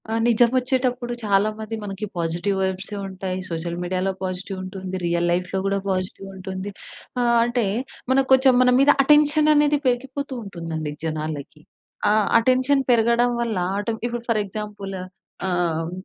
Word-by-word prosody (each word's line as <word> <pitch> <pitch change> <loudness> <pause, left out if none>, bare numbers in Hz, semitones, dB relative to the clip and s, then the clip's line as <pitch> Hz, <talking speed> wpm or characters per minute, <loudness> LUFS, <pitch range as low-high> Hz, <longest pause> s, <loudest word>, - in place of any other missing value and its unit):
ఆ! - - -3 0.2
నిజమోచ్చేటప్పుడు 250 +1 +2
చాలామంది 215 +2 0
మనకి 200 0 -4
పాజిటివ్ 175 +4 -1
వైబ్సే 190 +2 -2
ఉంటాయి. 185 -1 -4
సోషల్ 170 +1 -3
మీడియాలో 185 +2 -1
పాజిటివ్ 185 +1 -4
ఉంటుంది. 185 0 -6
రియల్ 170 0 +1
లైఫ్‌లో 180 +2 -1
గూడా 195 0 +1
పాజిటివ్ 185 +1 -2
ఉంటుంది. 190 +1 -5 0.5
ఆహ్, 240 -1 +3
అంటే 240 -1 0 0.5
మనక్కొంచెం 265 0 +5
మన 250 - +5
మీద 275 +1 +5
అటెన్షన్ 300 +1 +5
అనేది 295 0 +4
పెరిగిపోతూ 265 +3 -2
ఉంటుందండి 165 -5 -5
జనాలకి. 155 -1 -4 0.5
ఆ! - - +4 0.3
అటెన్షన్ 260 +3 +3
పెరగడం 235 +1 +3
వల్ల, 230 -4 -1 0.2
అంటే 225 +2 -2
ఇప్పుడు 240 -1 -4
ఫర్ 220 -2 +2
ఎక్సాంపుల్ 205 -1 -6 0.5
ఆహ్, 170 -2 0
200 Hz, 130 wpm, -23 LUFS, 185-245 Hz, 0.5 s, మనక్కొంచెం